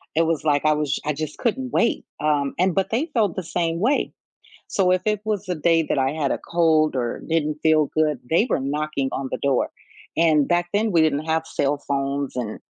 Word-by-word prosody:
It 165 - +4
was 160 -2 -1
like 145 -1 +1
I 155 - +5
was 150 -2 -1
I 150 - 0
just 150 +1 -5
couldn't 255 +2 -1
wait, 235 0 +1 0.2
um, 145 -2 +1
and 185 -1 +3
but 195 -1 +1
they 270 +9 -1
felt 210 -7 +1
the 185 - -3
same 165 0 -1
way. 260 +8 +1 0.6
So 185 -2 +2
if 185 - +1
it 210 -1 +1
was 205 -3 -2
a 180 - 0
day 165 +1 +2
that 140 - -1
I 135 0 +2
had 150 -2 -1
a - - 0
cold 160 -3 +2
or 120 -2 -2
didn't 155 -2 0
feel 155 -1 +4
good, 155 -2 +2
they 170 +8 +3
were - - +1
knocking 145 0 -2
on 135 -1 -3
the - - -2
door. 140 -2 +1 0.5
And 155 -3 +4
back 175 0 +1
then, 215 0 +1
we 165 - +4
didn't 155 -1 +2
have 160 0 0
cell 145 -2 0
phones 140 0 -2
and, 115 -4 -4
155 Hz, 220 wpm, -23 LUFS, 145-180 Hz, 0.6 s, I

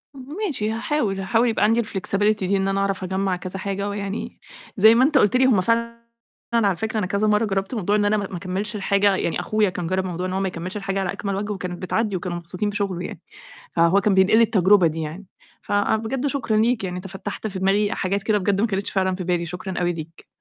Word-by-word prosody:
امم، 260 - -10 0.2
ماشي 220 - -2
هاحاول، 225 -4 -1
هاحاول 225 +5 +2
يبقى 220 - 0
عندي 225 +3 +3
الflexibility 205 +1 0
دي 195 +1 +1
إن 195 0 0
أنا 195 0 0
أعرف 195 -1 -1
أجمّع 190 0 -1
كذا 185 +1 -6
حاجة 200 +1 -3
ويعني 200 0 -5 0.4
زي 220 +3 +7
ما 250 - +5
أنت 295 +1 +3
قُلت 210 -1 +3
لي 260 +1 +5
هُم 230 -8 +4
فعلًا 235 +3 -1 0.5
على 205 -5 +3
فكرة 220 +3 -2
أنا 205 - 0
كذا 200 +3 0
مَرّة 210 +1 +3
جرّبت 195 +3 -2
موضوع 205 -1 0
إن 205 -1 +2
أنا 210 +1 +2
م - - 0
ما 190 -3 -5
اكمّلش 190 +5 -3
الحاجة، 200 -1 +2
يعني 170 - -1
أخويا 215 -2 +1
كان 180 -2 -4
جرّب 185 +1 0
موضوع 180 0 -3
إن 185 - -4
هو 190 - 0
ما 195 - 0
يكملش 180 +3 -5
الحاجة 195 -1 -2
على 190 -1 -1
أكمل 200 -1 -3
وجه 205 +2 -3
وكانت 180 -2 -6
بتعدّي 205 +2 -1
وكانوا 175 -1 -3
مبسوطين 180 +4 -3
بشغله 200 -4 -2
يعني، - - -8 0.6
فهو 170 +4 +4
كان 200 0 +2
بينقل 190 +3 +5
لي 230 - +6
التجربة 200 -4 +4
دي 160 0 -1
يعني، 160 +6 -6 0.4
فبجد 220 +6 0
شكرًا 265 -6 -1
ليك 225 -1 +2
يعني 180 -1 -3
أنت 180 +2 -6
فتّحت 190 +3 -6
في 195 -3 -4
دماغي 200 +3 +2
حاجات 195 +1 -1
كده 215 0 +2
بجد 195 0 0
ما 225 - +3
كانتش 195 -2 -2
فعلًا 190 -1 0
في 185 0 -5
بالي، 175 -1 0
شكرًا 180 +2 -5
أوي 175 0 +1
ليك. 165 0 -9
195 Hz, 235 wpm, -23 LUFS, 185-215 Hz, 0.6 s, زي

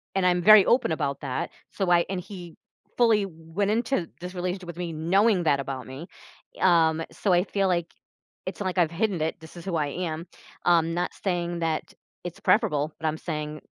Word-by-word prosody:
and 190 -1 +2
I'm 180 -1 +3
very 215 +1 +8
open 245 -8 +3
about 140 -3 -1
that. 130 -3 -3 0.2
So 190 -3 -1
I 170 -1 +5
and 190 -2 -2
he 180 -3 -9 0.4
fully 220 -4 +4
went 165 +4 -3
into 225 -4 0
this 180 +1 -6
relationship 180 +1 -3
with 170 0 -7
me, 175 -2 -3
knowing 185 +5 +2
that 145 -3 +3
about 135 -1 -5
me. 135 +7 -8 0.5
Um, 165 -3 +4
so 200 - -1
I 175 +1 +4
feel 195 0 0
like, 170 -2 0 0.6
it's - - -5
like 185 -1 -2
I've 165 -2 +3
hidden 190 -1 0
it- 160 - -1
this 160 +2 -13
is 170 - -10
who 180 - -2
I 150 -2 0
am. 165 +1 -4 0.4
I'm 165 -1 +3
not 175 +1 -1
stating 175 -2 -2
that 165 -2 -2 0.3
it's 175 -1 -7
preferable, 155 -9 +2
but 160 - -3
I'm 155 0 -1
saying 150 -2 -4
175 Hz, 195 wpm, -26 LUFS, 160-190 Hz, 0.6 s, very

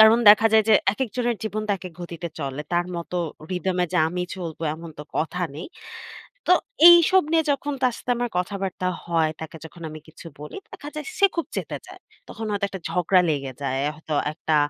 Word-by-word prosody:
কারণ 220 +2 +8
দেখা 225 +2 +6
যায় 220 -1 +6
যে - - +8 0.2
একেক 260 +2 -2
জনের 240 -2 0
জীবন 215 0 -2
তো - - +3
একেক 180 -1 -9
গতিতে 170 0 -6
চলে। 140 +1 -3
তার 175 0 +2
মতো 170 +1 -5 0.4
রিথম 185 0 -1
এ - - -3
যে - - +4
আমি 180 +1 -3
চলবো 165 -3 -6
এমন 165 0 -9
তো - - -5 0.2
কথা 180 +3 -1
নেই। 165 - -6 0.8
তো 360 - +7 0.4
এইসব 345 +2 +7
নিয়ে 325 -1 +4
যখন 285 +1 -2
তার 250 -2 +3
সাথে 245 - -3
আমার 245 -1 -1
কথাবার্তা 185 0 -2 0.2
হয় 165 -2 +1
তাকে 160 0 -7
যখন 170 +1 -12
আমি 155 0 -8
কিছু 160 +2 -14
বলি 150 - -8
দেখা 290 - -8
যায় 305 - -5
সে 395 - +7
খুব 335 - -1
চেতে - - -3
যায়। - - -12 0.3
তখন 225 - -6
হয়তো 200 0 0
একটা 190 -3 -7
ঝগড়া 180 +2 +3
লেগে 140 -3 -2
যায়। 135 -1 -1 0.2
হয়তো 155 -1 -4 0.2
একটা 155 -1 0
180 Hz, 205 wpm, -24 LUFS, 165-225 Hz, 0.8 s, কারণ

